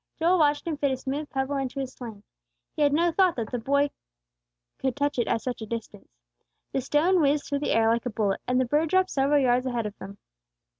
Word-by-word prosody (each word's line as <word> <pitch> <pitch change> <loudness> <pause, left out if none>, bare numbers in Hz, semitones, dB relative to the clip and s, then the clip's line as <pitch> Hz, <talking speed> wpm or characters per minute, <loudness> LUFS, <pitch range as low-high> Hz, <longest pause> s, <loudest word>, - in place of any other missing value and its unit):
Joel 345 +2 +3
watched 290 -1 +2
him 325 -3 -2
fit 285 -1 +1
a 265 - -1
smooth 285 +4 -4
pebble 270 +1 -2
into 270 0 -3
his 265 -1 -4
sling; 220 -5 -9 0.5
he - - -3
had 290 -1 +4
no 335 +4 +2
thought 365 0 +3
that 230 -3 -4
the 245 - -2
boy 280 +4 +1 0.9
could 265 -2 -1
touch 285 -2 -1
it 235 - +1
at 225 - 0
such 245 -2 -4
a 220 - -6
distance. 230 0 -7 0.6
The 270 - -1
stone 330 +7 +2
whizzed 285 0 +2
through 285 0 -1
the 290 - 0
air 225 0 +3
like 235 +2 0
a - - -1
bullet, 210 -3 -1
and 250 0 +2
the 260 - +2
bird 300 +5 +1
dropped 375 +1 +2
several 280 +1 +2
yards 250 -1 +2
ahead 240 -3 -2
of 210 -1 -5
them. 200 +1 -9
270 Hz, 235 wpm, -26 LUFS, 240-295 Hz, 0.9 s, had